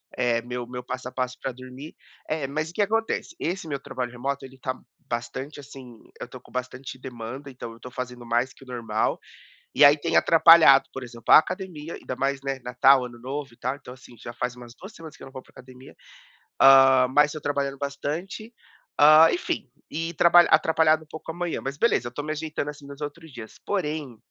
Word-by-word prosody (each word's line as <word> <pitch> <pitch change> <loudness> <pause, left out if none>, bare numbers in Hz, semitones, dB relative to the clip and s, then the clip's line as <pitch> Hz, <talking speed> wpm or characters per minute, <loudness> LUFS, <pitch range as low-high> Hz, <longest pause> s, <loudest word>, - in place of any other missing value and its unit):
eh, 120 -2 +1
meu 125 0 -5
meu 125 0 -7
passo 130 0 -6
a - - -16
passo 130 0 -3
pra 135 - -3
dormir. 130 +4 -11 0.3
Eh, 155 -3 -2
mas 155 +3 -3
o - - -12
que 210 - -1
acontece? 225 - -1
Esse 175 -1 -3
meu 140 -2 -3
trabalho 125 -2 -5
remoto, 135 +2 -4
ele 130 0 -14
tá 130 0 -3 0.3
bastante, 120 +5 -5
assim, 130 -4 -12 0.2
eu - - -6
tô 130 - -11
com - - -20
bastante 130 +1 -6
demanda, 130 +2 -8
então, 120 -2 -9
eu 115 - -17
tô 125 - -10
fazendo 125 -1 -7
mais 120 +3 0
que - - -17
o - - -18
normal. 115 -3 -2 0.6
E 145 - +5
aí, 145 +1 +8
tem 165 +3 -2
atrapalhado, 165 -4 +7
por 135 - -6
exemplo, 120 -1 0
a - - +12
academia, 170 -2 -6
ainda 130 - -7
mais, 135 +2 -1
né, 135 -1 -3
Natal, 125 +2 +4
Ano 120 -1 -11
Novo 135 +1 -6
e - - -22
tal. 130 +2 -3
Então 125 -3 -12
assim, 125 -1 -16
já 120 - -8
faz 125 0 -4
umas 120 -1 -12
2 195 +3 -11
semanas 160 -2 -12
que - - -14
eu - - -8
não 135 - -13
vou 130 - -8
pra - - -26
academia, 130 +1 -15 0.6
ah, 135 -1 +7
mas 150 +1 +4
eu 155 - -7
trabalhando 140 -1 -2
bastante, 155 - -5 0.5
ah, 155 +2 +8
enfim, 140 -6 -3 0.2
e 165 +2 -3
trabalha 175 +2 +6
atrapalhado 160 -1 +3
um - - -22
pouco 160 +1 -8
a - - -11
manhã, 175 -1 -3
mas 135 +1 -5
beleza, 120 - +1
tô 145 +4 -6
me 155 - -4
ajeitando, 155 -1 -4
assim, 145 -1 -10
nos 140 +1 -11
outros 150 +2 -7
dias, 115 -3 -10
porém, 150 - -3
135 Hz, 215 wpm, -25 LUFS, 125-155 Hz, 0.6 s, a